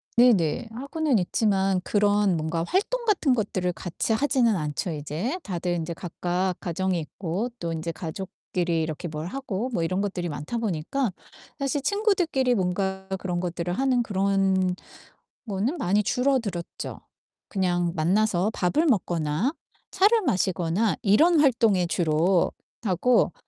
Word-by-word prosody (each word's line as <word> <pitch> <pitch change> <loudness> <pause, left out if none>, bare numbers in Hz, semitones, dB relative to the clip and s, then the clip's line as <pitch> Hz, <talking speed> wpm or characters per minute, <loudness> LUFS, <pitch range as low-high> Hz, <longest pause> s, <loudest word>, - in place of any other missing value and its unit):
네네. 225 -4 +4
하고는 280 - 0
있지만 195 0 +1
그런 205 -3 +2
뭔가 160 +1 -1
활동 470 +6 0
같은 340 - +3
것들을 185 -5 -1
같이 175 +6 -2
하지는 245 -3 +2
않죠, 150 +3 -2
이제. 160 - -3
다들 175 -2 -2
인제 170 0 -3
각각 180 +1 -2
가정이 185 +1 -1
있고 180 +7 -3
또 170 -1 -3
인제 165 +1 -3
가족끼리 175 0 -3
이렇게 160 +2 -3
뭘 155 0 -5
하고 245 0 -3
뭐 170 - 0
이런 185 +4 0
것들이 185 -3 -2
많다 150 +10 -4
보니까 220 - -1 0.5
사실 275 +1 -1
친구들끼리 355 - +2
뭔가 190 0 -1
그런 180 -2 -2
것들을 175 -1 -3
하는 255 +4 +2
그런 195 -3 +1 0.7
거는 215 - -1
많이 205 - +2
줄어들었죠. 240 -7 -1 0.5
그냥 175 -3 0
만나서 190 +4 +2
밥을 295 - +1
먹거나 175 - +1 0.4
차를 415 +4 +4
마시거나 185 - +1
이런 300 - +5
활동에 230 -9 +3
주로 170 +1 +2 0.3
하고 205 +1 +3
190 Hz, 295 characters per minute, -25 LUFS, 175-240 Hz, 0.7 s, 이런